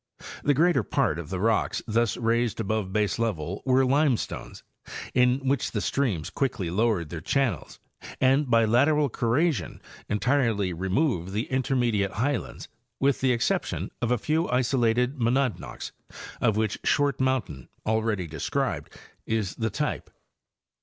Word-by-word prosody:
The 145 - +3
greater 160 -2 +3
part 80 -5 0
of 85 -2 -7
the 95 -1 -3
rocks 110 +2 +1
thus 115 0 +1
raised 115 -1 0
above 110 -2 -1
baselevel 105 -4 -1
were 130 +1 +4
limestones, 135 -2 0 0.5
in 125 +2 +2
which 135 -1 +1
the 105 - 0
streams 105 - -1
quickly 120 -11 -2
lowered 100 -5 +1
their 80 -1 -6
channels 120 - -1 0.4
and 135 +1 +3
by 115 -1 +4
lateral 140 +6 +3
corrasion 120 - 0 0.3
entirely 110 -4 +1
removed 95 - -1
the 110 +3 -1
intermediate 120 -7 +1
highlands, 130 +3 -2 0.3
with 140 0 +2
the 130 -1 +3
exception 120 -1 -1
of 120 - 0
a 125 - +2
few 155 +8 0
isolated 125 +1 +1
monadnocks, 120 -3 -1 0.5
of 110 -2 +2
which 110 0 0
Short 145 -2 +2
mountain, 125 - -1 0.2
already 110 -3 0
described, 80 -2 -3 0.3
is 110 -4 -1
the 110 -1 -2
type. - - -3
115 Hz, 135 wpm, -26 LUFS, 105-130 Hz, 0.5 s, were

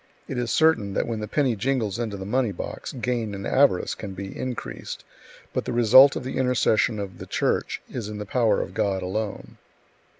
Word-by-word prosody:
It 130 - -3
is 120 -1 -2
certain 110 -12 +3
that - - +1
when 115 -2 -3
the 105 - -4
penny 130 0 +1
jingles 115 -1 -1
into 110 -4 -3
the 95 - -6
money 120 +2 +1
box, 90 - -6
gain 120 -4 -2
and 100 - -6
avarice 130 -9 +3
can 100 -3 -7
be 95 +1 -7
increased, 130 -2 -5 0.5
but - - -1
the - - -3
result 125 +4 +7
of - - -4
the 130 - -4
intercession 125 -3 +2
of 100 -2 -6
the - - -8
Church - - -1
is 115 -4 -5
in 105 - -6
the 105 - -5
power 110 -1 +2
of - - -6
God 95 -2 0
alone. 100 +3 -4
110 Hz, 200 wpm, -25 LUFS, 100-125 Hz, 0.5 s, result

